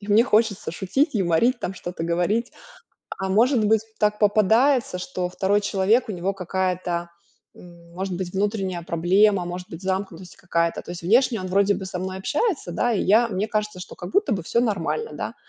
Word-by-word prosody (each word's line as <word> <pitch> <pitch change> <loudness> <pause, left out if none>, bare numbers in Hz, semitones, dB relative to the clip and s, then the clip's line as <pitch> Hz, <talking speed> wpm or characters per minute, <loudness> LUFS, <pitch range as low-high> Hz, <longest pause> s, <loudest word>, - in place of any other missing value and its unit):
и 205 - -11
мне 215 +3 +5
хочется 220 -4 +1
шутить, 255 - 0
юморить, 200 +6 +2
там, 190 - -3
что-то 175 -2 -6
говорить, 180 +8 0 0.7
а, 190 - -2
может 230 +4 +3
быть, 215 0 +3 0.2
так 210 0 +1
попадается, 220 +2 +3
что 180 0 -3
2 195 +3 +1
человек, 205 +4 +1
у - - -3
него 185 +1 -2
какая-то, 180 -2 -2 0.4
м, 170 -1 -16
может 190 +1 -3
быть, 180 -1 -5
внутренняя 195 -3 -1
проблема, 180 +4 +2
может 180 +1 -6
быть, 165 +3 -9
замкнутость 190 -2 -4
какая-то. 170 -2 -1
То - - -11
есть 175 -1 -7
внешне 230 +4 +3
он 185 - -5
вроде 200 +2 +2
бы 190 - -5
со 185 -1 -5
мной 185 +1 -4
общается, 295 - -1
да, 240 +7 0
и 210 - 0
я 225 +4 +4
мне 200 0 -2
кажется, 210 -3 -2
что 180 - -9
как 175 - -8
будто 400 - +2
бы 190 -4 -1
всё 230 +8 0
нормально, 225 - -1
да. - - -5
195 Hz, 190 wpm, -23 LUFS, 180-215 Hz, 0.7 s, мне